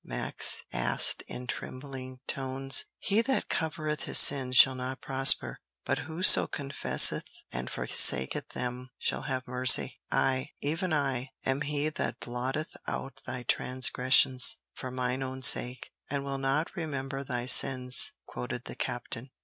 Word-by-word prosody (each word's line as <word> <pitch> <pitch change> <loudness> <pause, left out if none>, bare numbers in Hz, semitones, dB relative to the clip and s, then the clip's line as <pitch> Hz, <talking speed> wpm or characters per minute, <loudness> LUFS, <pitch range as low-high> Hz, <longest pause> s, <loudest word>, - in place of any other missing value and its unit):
Max - - +1
asked - - +2
in 125 - -9
trembling 130 0 -9
tones. 135 0 +2
"'He 210 +1 0
that 265 +3 -3
covereth 155 -2 -4
his - - +4
sins 130 -2 +4
shall 130 - +7
not 130 +1 -7
prosper; 135 0 +3 0.3
but - - -2
whoso 170 +4 +4
confesseth 140 -1 +2
and 65 +1 -6
forsaketh 65 +1 +1
them 125 +1 -6
shall - - -3
have 130 -2 -5
mercy.' 125 +1 +3
'I, 130 -1 -1
even 165 +5 -3
I, 135 -4 -2 0.2
am 135 +2 -2
He 150 0 -3
that 155 - -5
blotteth 130 +5 -5
out 135 0 -7
thy 125 - -6
transgressions, 130 +1 +2 0.2
for 130 - -8
mine 125 +1 -4
own 130 0 -7
sake, 125 0 +4 0.2
and 140 0 -4
will 135 0 -5
not 135 +6 -2
remember 140 -5 -6
thy 125 -3 -4
sins,'" 125 -1 +4
quoted 60 0 -7
the - - -9
captain. 120 +4 -6
130 Hz, 140 wpm, -27 LUFS, 125-140 Hz, 0.3 s, shall